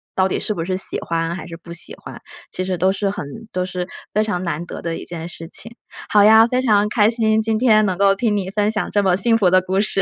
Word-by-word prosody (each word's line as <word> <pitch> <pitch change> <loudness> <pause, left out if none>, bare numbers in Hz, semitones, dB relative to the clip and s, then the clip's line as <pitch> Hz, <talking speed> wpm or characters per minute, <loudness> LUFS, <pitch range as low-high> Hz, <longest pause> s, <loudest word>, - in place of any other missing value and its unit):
到 190 0 +2
底 - - -1
是 215 - -1
不 165 - -4
是 185 +2 -2
喜 190 - +1
欢 165 +1 -2
还 - - -7
是 165 -1 -9
不 170 0 -11
喜 170 - -1
欢， - - -11 0.3
其 185 - -4
实 185 -1 -2
都 185 +3 +2
是 200 0 -1
很 170 -7 -5 0.2
都 180 0 -2
是 180 -1 -4 0.3
非 215 +1 +2
常 205 -4 -2
难 170 0 -3
得 - - -8
的 165 -1 -4
一 - - -8
件 170 -1 -7
事 165 -1 -8
情。 230 +1 -5 0.3
好 205 -1 +5
呀， 220 +2 +7
非 255 +1 0
常 210 -4 +3
开 210 0 +3
心， 220 -2 +2
今 220 0 0
天 215 -4 +4
能 185 -2 -1
够 195 0 +4
听 210 0 0
你 190 -1 -3
分 210 +1 0
享 210 - -2
这 205 -1 +1
么 185 -1 +2
幸 225 +3 +3
福 190 -5 +3
的 185 +1 +5
故 190 +2 0
事。 205 -2 +1
195 Hz, 295 characters per minute, -20 LUFS, 180-215 Hz, 0.3 s, 呀